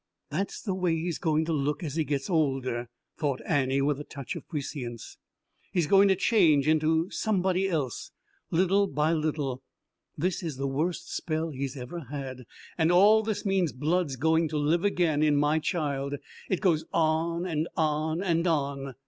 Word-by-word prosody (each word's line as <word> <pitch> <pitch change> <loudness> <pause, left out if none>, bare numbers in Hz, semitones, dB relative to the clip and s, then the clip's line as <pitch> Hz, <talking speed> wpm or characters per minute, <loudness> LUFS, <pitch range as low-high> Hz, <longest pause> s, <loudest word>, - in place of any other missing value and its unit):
"That's 190 +7 -2
the 195 - -1
way 180 -3 +1
he's 165 +1 -3
going 160 -2 +1
to 165 - -1
look 145 +2 -1
as 150 -4 -4
he 160 +1 +1
gets 140 -2 -2
older," 135 -8 0 0.3
thought 140 -4 0
Annie 135 -3 +1
with 145 0 +1
a - - -5
touch 140 -3 -7
of - - -9
prescience. 135 -6 -6 0.5
"He's 175 -4 +1
going 195 +5 +6
to 190 - +4
change 165 - +3
into 160 +2 +2
somebody 190 -2 +1
else 145 -8 -2 0.4
little 190 +4 +3
by 150 +2 +1
little. 150 -5 -1 0.6
This 180 +4 -1
is 160 -7 -4
the 135 - -2
worst 155 +6 -2
spell 160 0 -2
he's 135 0 -4
ever 135 +6 -7
had. 130 -3 -6 0.3
And 160 +1 +4
all 205 +5 +6
this 215 -1 -3
mean 195 -3 +2
blood's 155 +1 0
going 160 +4 +2
to 155 0 -3
live 155 +4 +1
again 170 -6 +2
in 150 -1 +4
my 150 +2 +2
child. 145 -4 -2 0.3
It 190 - 0
goes 170 -6 +2
on 165 +2 +1
and 160 -2 -1
on 155 +2 0
and 170 -2 +1
on." 140 -4 -1
155 Hz, 175 wpm, -28 LUFS, 140-175 Hz, 0.6 s, going